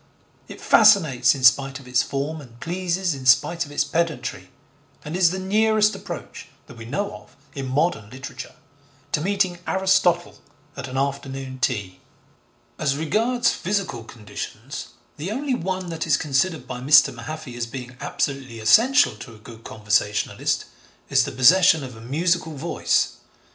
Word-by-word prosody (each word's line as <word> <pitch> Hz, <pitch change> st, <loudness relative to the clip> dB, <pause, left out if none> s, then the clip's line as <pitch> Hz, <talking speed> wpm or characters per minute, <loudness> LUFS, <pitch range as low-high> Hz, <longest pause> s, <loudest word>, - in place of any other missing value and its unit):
It -, -, -10 dB
fascinates 160 Hz, -, +5 dB
in 135 Hz, -, -7 dB
spite 135 Hz, +2 st, +4 dB
of 130 Hz, -, -15 dB
its 125 Hz, +1 st, +2 dB
form 145 Hz, +3 st, -4 dB
and 120 Hz, -4 st, -15 dB
pleases 175 Hz, +1 st, -1 dB
in 130 Hz, -2 st, -6 dB
spite 160 Hz, +6 st, +3 dB
of -, -, -13 dB
its 145 Hz, -, +1 dB
pedantry, 160 Hz, -8 st, -3 dB, 0.6 s
and 150 Hz, +3 st, -5 dB
is 180 Hz, -2 st, +4 dB
the 185 Hz, -, -4 dB
nearest 215 Hz, +2 st, +2 dB
approach, -, -, -8 dB, 0.2 s
that 140 Hz, -, -14 dB
we 115 Hz, -, -9 dB
know 200 Hz, -, -3 dB
of, 105 Hz, 0 st, -20 dB, 0.2 s
in 135 Hz, -2 st, -5 dB
modern 130 Hz, -5 st, 0 dB
literature 130 Hz, +3 st, -9 dB, 0.6 s
to 150 Hz, -, 0 dB
meeting 190 Hz, -1 st, 0 dB
Aristotle 190 Hz, -2 st, +1 dB, 0.4 s
at 140 Hz, -1 st, -6 dB
an 130 Hz, 0 st, -6 dB
afternoon 135 Hz, -1 st, -3 dB
tea. 105 Hz, -8 st, -2 dB, 0.8 s
As 140 Hz, -2 st, 0 dB
regards 230 Hz, +10 st, +1 dB
physical 185 Hz, -, -3 dB
conditions, 110 Hz, +4 st, -8 dB, 0.3 s
the 155 Hz, +5 st, -5 dB
only 265 Hz, +5 st, -2 dB
one 185 Hz, -4 st, -3 dB
that 165 Hz, 0 st, -4 dB
is 155 Hz, -2 st, +4 dB
considered 155 Hz, +4 st, 0 dB
by 125 Hz, -1 st, -6 dB
Mr. 145 Hz, +3 st, +5 dB
Mahaffy 125 Hz, +3 st, -8 dB
as 120 Hz, -1 st, -3 dB
being 125 Hz, 0 st, -8 dB
absolutely 135 Hz, -4 st, -3 dB
essential 235 Hz, -, +4 dB
to 115 Hz, -3 st, -11 dB
a -, -, -15 dB
good 115 Hz, +1 st, -13 dB
conversationalist, 105 Hz, -1 st, -1 dB, 0.5 s
is -, -, +4 dB
the -, -, -5 dB
possession 160 Hz, +3 st, +5 dB
of 125 Hz, -3 st, -8 dB
a 110 Hz, -, -12 dB
musical 160 Hz, +6 st, -1 dB
voice. 155 Hz, +5 st, 0 dB
145 Hz, 155 wpm, -23 LUFS, 125-180 Hz, 0.8 s, fascinates